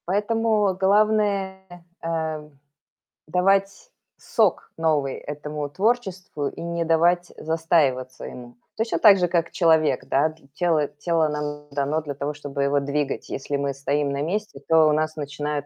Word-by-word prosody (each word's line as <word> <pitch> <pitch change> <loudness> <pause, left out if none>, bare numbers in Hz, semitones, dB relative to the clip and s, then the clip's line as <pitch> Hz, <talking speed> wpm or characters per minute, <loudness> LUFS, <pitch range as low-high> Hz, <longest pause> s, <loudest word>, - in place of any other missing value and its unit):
Поэтому 210 +1 +1
главное, 200 0 +2 0.4
э, 160 -2 -3 0.8
давать 195 - +1 0.3
сок 215 -7 0
новый 150 -4 +1
этому 150 0 -5
творчеству 190 -5 -1
и - - -7
не 170 0 -2
давать 175 +2 +2
застаиваться 150 -6 0
ему. 120 -1 -10 0.2
Точно 225 +1 -1
так 205 -3 +8
же, 180 -1 +2
как 170 -1 0
человек, 160 -6 +3
да. 145 +4 +2
Т 155 0 -16
тело 160 -4 +1
тело 160 +2 0
нам 150 0 -4
дано 145 +2 0
для 145 -2 -5
того, 140 +2 -3
чтобы 145 -1 -4
его 140 +1 +2
двигать. 140 0 -2
Если 140 +1 -3
мы 140 0 -1
стоим 140 +1 -1
на 140 0 -2
месте, 200 0 -3
то 160 -1 +5
у - - +4
нас 155 +1 0
начинает, 145 -1 -4
160 Hz, 145 wpm, -24 LUFS, 145-185 Hz, 0.8 s, так